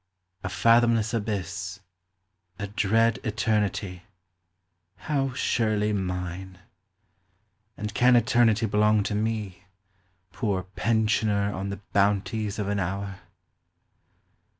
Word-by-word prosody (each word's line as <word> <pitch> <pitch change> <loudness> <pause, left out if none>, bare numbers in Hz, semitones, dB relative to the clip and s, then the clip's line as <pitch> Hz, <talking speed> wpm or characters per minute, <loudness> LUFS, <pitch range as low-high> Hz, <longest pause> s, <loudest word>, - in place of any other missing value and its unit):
a 90 - -2
fathomless 115 +1 +3
abyss; 95 -4 -3 0.8
A 100 - -3
dread 110 +2 +2
eternity; 105 -4 -1 0.9
how 135 -1 -1
surely 110 -4 +1
mine! 90 -1 -4 1.2
And 105 0 -5
can 125 +3 +5
eternity 120 -2 +3
belong 105 0 +3
to 100 - -2
me, 105 -3 -3 0.7
Poor 95 -1 -1
pensioner 105 0 0
on 95 +1 -4
the 100 +1 -6
bounties 100 +1 +1
of 105 -2 -2
an 100 0 0
hour 95 +1 -3
105 Hz, 95 wpm, -26 LUFS, 95-110 Hz, 1.2 s, can